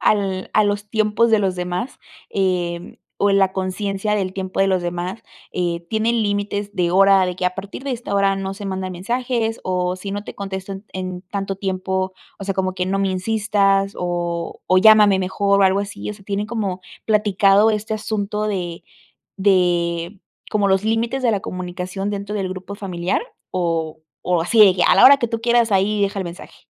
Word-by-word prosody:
al 195 -3 0
a 215 - +4
los 205 0 -1
tiempos 220 +1 +2
de 220 - +5
los 190 -3 0
demás, 180 +7 -4 0.3
em, 175 -3 -1 0.2
o 205 - +4
en 195 - +4
la 190 -1 +3
conciencia 195 +2 -2
del 190 -3 -1
tiempo 190 0 -3
de 195 - +4
los 185 -1 +2
demás, 175 +4 -4 0.3
eh, 175 -1 -2
¿tienen 225 +1 +1
límites 205 0 -2
de 175 -1 +1
hora 195 0 +5
de 180 - -3
que 185 - -4
a 180 - -1
partir 200 +6 -7
de 280 - -4
esta 240 -4 -4
hora 195 -1 +3
no 195 0 -4
se 205 - -9
mandan 190 -1 -3
mensajes, 230 +4 -2
o 180 0 -1
si 195 +1 -6
no 205 0 -3
te - - -9
contesto 195 -1 -5
en 195 +2 -8
en 185 -1 -5
tanto 195 0 -4
tiempo, 190 -1 -2 0.3
o 195 - -6
sea, 195 -1 -2
como 185 -1 -1
que 180 0 -2
no 195 +1 0
me 195 - +1
insistas, 195 0 +1
o 175 -1 -3
o 185 - +5
llámame 210 -2 +7
mejor, 200 +2 +1
o - - +5
algo 190 +1 +3
así, 205 0 -6
o - - -6
sea, 200 -2 -17
tienen 205 +1 -2
como 200 -5 -3 0.3
platicado 210 0 +4
este 215 +1 -2
asunto 210 0 -2
de 175 -5 -4 0.5
de 175 -1 +1 0.3
como 205 -2 +2
los 190 +2 +2
límites 230 +4 0
de 240 - +3
la 200 - 0
comunicación 185 +2 -4
dentro 200 +1 -4
del 190 -2 -2
grupo 185 +1 -7
familiar, 180 - -2 0.3
o 165 -3 -2 0.2
o 175 -2 +1
así 225 +6 0
de, 195 -3 +8
ya, 180 - +2
a - - +6
la - - +7
hora 280 +2 +10
que 235 - -1
tú 230 0 -3
quieras, 235 -2 +2
ahí 200 +2 +2
deja 200 0 0
el - - -3
mensaje? 170 +1 -10
195 Hz, 200 wpm, -20 LUFS, 185-210 Hz, 0.5 s, hora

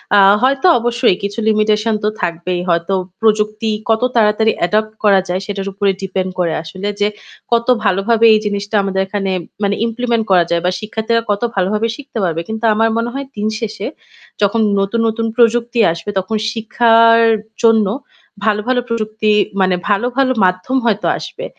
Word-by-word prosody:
আ - - +6 0.2
হয়তো 275 +6 +2
অবশ্যই 240 -4 +1
কিছু 200 +3 -3
limitation 215 +1 +1
তো 210 - +2
থাকবেই। 175 +1 -2
হয়তো 170 +3 0 0.3
প্রযুক্তি 215 0 +1 0.2
কত 225 +1 +2
তাড়াতাড়ি 220 0 +3 0.2
adopt 215 +3 0
করা 200 -2 +5
যায় 185 +2 -1
সেটার 195 -1 -4
উপরে 200 0 +1
depend 190 -1 -2
করে 170 -3 0
আসলে 185 +5 -6
যে 205 - +4 0.4
কত 235 +1 +1 0.2
ভালোভাবে 220 +4 +2
এই 215 - +4
জিনিসটা 205 +1 -3
আমাদের 190 -1 -1
এখানে 195 -1 -2 0.3
মানে 200 0 +1
implement 235 -1 -1
করা 180 -2 +5
যায় 170 0 +1
বা 180 - +2
শিক্ষার্থীরা 220 +2 -1
কত 205 - -1
ভালো 185 -1 +1
ভাবে 220 +2 0
শিখতে 275 -4 -9
পারবে। 165 -2 -1
কিন্তু 220 +1 -3
আমার 225 +1 +2
মনে 230 +1 -1
হয় 275 0 -4
দিনশেষে 215 0 -3 0.5
যখন 205 +3 +2 0.2
নতুন, 195 +4 -1
নতুন 225 +1 -1
প্রযুক্তি 235 0 +2
আসবে 170 +5 -6
তখন 215 +4 -3
শিক্ষার 230 0 +4 0.4
জন্য 225 -3 +4 0.6
ভালো, 210 0 +2
ভালো 250 -1 +2
প্রযুক্তি 215 -1 -1 0.3
মানে 185 -1 +2
ভালো, 205 +4 +1
ভালো 265 -1 +3
মাধ্যম 185 +9 0
হয়তো 215 -2 +1
আসবে। - - -7
215 Hz, 165 wpm, -16 LUFS, 195-230 Hz, 0.6 s, আ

